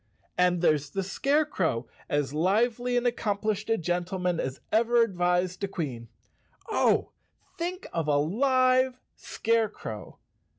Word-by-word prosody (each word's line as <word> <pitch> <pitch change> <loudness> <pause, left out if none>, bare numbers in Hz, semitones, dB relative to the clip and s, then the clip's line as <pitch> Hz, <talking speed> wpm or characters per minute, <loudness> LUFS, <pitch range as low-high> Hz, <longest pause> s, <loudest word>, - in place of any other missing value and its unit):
And 180 -1 +2
there's 150 -3 +2
the 195 - -2
Scare¬ 280 +10 +1
crow, 145 - -1 0.2
as 145 -1 0
lively 230 +9 +1
and 245 - 0
accomplished 215 -2 -1
a 225 - +3
gentleman 180 0 -1
as 130 0 -3
ever 235 +2 +4
advised 180 -2 0
a - - +1
Queen. 140 -12 -5 0.6
Oh, - - +2 0.4
think 360 +2 -4
of 165 -2 -1
a 145 -1 +3
live 255 - +3 0.2
Scarecrow! 215 - -2
195 Hz, 125 wpm, -27 LUFS, 165-240 Hz, 0.6 s, ever